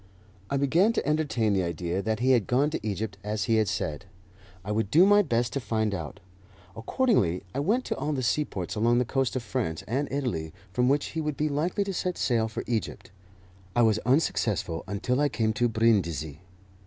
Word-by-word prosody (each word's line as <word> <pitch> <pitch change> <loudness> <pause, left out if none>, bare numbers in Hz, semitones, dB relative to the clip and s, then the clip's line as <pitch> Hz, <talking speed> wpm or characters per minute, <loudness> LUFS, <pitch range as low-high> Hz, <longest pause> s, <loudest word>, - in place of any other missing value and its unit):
I 140 - 0
began 165 - +3
to 230 - -2
entertain 145 -9 +1
the 95 - +2
idea 85 +1 -2
that 110 +2 -2
he 130 +1 +3
had 120 -6 +3
gone 140 +5 +2
to 130 - -4
Egypt 105 -1 -3
as 105 0 -2
he 115 0 +2
had 110 -1 +2
said. 85 -7 -3 0.6
I 105 - -3
would 105 -1 0
do 165 - +6
my 205 +1 +6
best 120 - 0
to 140 - -1
find 110 -4 -1
out. 85 +1 -6 0.6
Accordingly, 115 - +1
I - - -2
went 220 - +1
to - - -2
all 150 - -2
the 135 -3 -2
seaports 115 - -1
along 115 +3 +2
the 125 - +2
coast 135 +1 -1
of 130 - -2
France 80 -6 -3
and 135 +5 -1
Italy 115 - -2 0.2
from 125 +4 +2
which 140 +1 +1
he 160 - -3
would 150 -2 -3
be 150 0 0
likely 165 +8 0
to 195 -1 -4
set 180 0 -2
sail 115 -3 +1
for 110 - -5
Egypt. 115 -4 -3 0.6
I 120 - +4
was 110 -1 +3
unsuccessful 110 - 0
until 105 +7 -1
I 145 - +3
came 110 -4 0
to 120 +2 +1
Brindisi. 85 -10 +1
115 Hz, 205 wpm, -27 LUFS, 105-145 Hz, 0.6 s, do